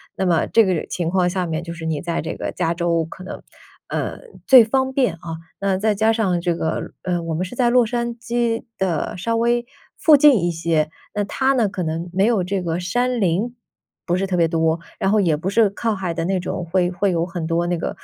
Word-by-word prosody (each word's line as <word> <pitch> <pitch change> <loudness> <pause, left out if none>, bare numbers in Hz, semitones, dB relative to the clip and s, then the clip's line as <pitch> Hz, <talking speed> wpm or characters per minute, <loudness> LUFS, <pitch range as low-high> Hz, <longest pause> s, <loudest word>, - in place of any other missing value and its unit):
那 190 - -1
么 170 -3 +2
这 225 -1 +4
个 185 -4 0
情 170 -2 -2
况 180 0 +2
下 180 0 -1
面 160 0 -3
就 170 0 -6
是 165 -1 -8
你 160 -2 -2
在 170 -1 -2
这 160 - -4
个 - - -4
加 170 -2 -1
州 170 -1 0
可 185 +3 -11
能， - - -8 0.5
呃， - - -3 0.3
最 255 -4 +9
方 265 +3 0
便 260 -8 +1
啊。 165 -1 -7 0.2
那 195 -1 0
再 215 +2 +1
加 220 +2 +2
上 195 -6 0
这 175 -1 0
个， 160 -1 -3
呃， 175 -2 -1
我 165 -1 -4
们 180 +4 -1
是 185 - -9
在 245 -1 +2
洛 245 0 +4
杉 235 +1 -2
矶 235 -1 -1 0.2
的 180 -5 -1
稍 210 +6 -2
微 235 +1 +1 0.3
附 310 -2 +6
近 280 - +5
一 175 - +2
些， 160 -2 0 0.2
那 205 - 0
它 265 +6 +1
呢 235 -6 +2
可 185 -1 -4
能 165 +2 -3
没 190 +2 +2
有 220 -5 +2
这 190 +1 -2
个 165 0 -2
山 245 +7 0
林， 200 +7 0 0.5
不 175 0 +1
是 195 +1 -1
特 185 - -1
别 170 -2 +3
多。 160 0 +1 0.2
然 195 - +1
后 215 - +4
也 165 -5 +2
不 175 +5 -3
是 215 +1 +4
靠 220 +2 -2
海 185 -3 -3
的 165 0 -2
那 190 +1 0
种， 180 0 -4
会 175 +1 +1
会 190 +2 0
有 170 -1 0
很 170 -2 -5
多 170 +1 0
那 175 0 0
个 165 - -3
185 Hz, 255 characters per minute, -21 LUFS, 170-225 Hz, 0.5 s, 最